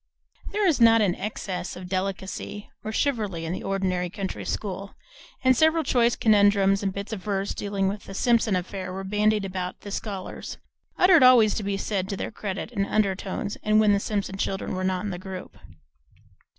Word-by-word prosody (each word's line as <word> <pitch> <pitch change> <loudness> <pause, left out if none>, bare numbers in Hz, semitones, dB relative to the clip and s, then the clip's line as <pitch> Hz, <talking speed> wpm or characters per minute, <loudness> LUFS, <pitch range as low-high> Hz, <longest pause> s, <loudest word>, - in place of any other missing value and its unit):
There 415 0 +1
is 320 -9 +2
not 230 -1 +7
an 185 -4 +2
excess 195 -2 -4
of 180 0 -8
delicacy 195 +2 -4
or 215 - -4
chivalry 215 - -1
in 165 - -3
the - - -4
ordinary 185 -2 -1
country 190 +2 -5
school, 200 -1 -4 0.5
and 260 0 +5
several 315 +4 +3
choice 240 -3 +3
conundrums 200 -2 +4
and 195 -1 0
bits 200 +3 -6
of 205 - -5
verse 200 0 -2
dealing 200 -1 -1
with 200 +1 -4
the 195 - -9
Simpson 230 -2 +2
affair 185 +1 -4
were 190 +1 -5
bandied 210 +1 +1
about 185 -1 -3
among - - -41
the 205 - -8
scholars, 195 -2 -5 0.4
uttered 360 -4 +6
always, 235 -4 +6
be 200 -1 -2
it 195 - -4
said 195 -3 -2
to 195 - -3
their - - -4
credit, 200 -3 -5
in 200 - 0
undertones, 200 -1 -1
and 215 0 +3
when 210 -1 +5
the 200 - +3
Simpson 200 -2 -3
children 195 0 -2
were 185 0 -2
not 185 -1 0
in 205 - -3
the 175 - -5
group. 185 -1 -8
200 Hz, 190 wpm, -25 LUFS, 190-215 Hz, 0.5 s, not